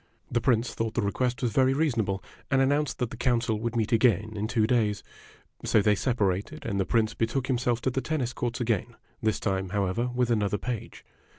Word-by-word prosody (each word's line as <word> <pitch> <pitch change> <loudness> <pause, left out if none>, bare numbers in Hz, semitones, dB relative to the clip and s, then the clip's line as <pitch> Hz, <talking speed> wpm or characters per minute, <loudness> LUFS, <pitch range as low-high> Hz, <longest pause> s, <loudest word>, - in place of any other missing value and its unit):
The 120 - +1
Prince 120 -2 +2
thought 115 -1 -3
the 120 - +1
request 125 +5 -1
was 120 - +1
very 130 +4 +3
reasonable, 115 -10 0 0.3
and 135 - +3
an 135 0 +4
nounced 145 +1 0
that 125 -3 -2
the - - -7
council 115 -3 +1
would 115 +1 -3
meet 110 -2 0
again 110 -2 +3
in 105 +1 -2
two 110 -2 +2
days. 110 -4 +1 0.6
So 110 - +3
they 105 +1 +4
separated, 105 +4 -1
and 100 - -1
the 95 - 0
Prince 115 -1 +2
betook 120 +3 -1
himself 120 -2 0
to 130 - 0
the 135 - -1
tennis 135 -6 -2
courts 120 0 -3
again, 115 0 -1 0.3
this 110 -1 +1
time, 95 -2 -1
however, 100 +4 0
with 125 -1 +1
another 105 -2 +1
page. 120 -2 -5
115 Hz, 205 wpm, -27 LUFS, 105-125 Hz, 0.6 s, an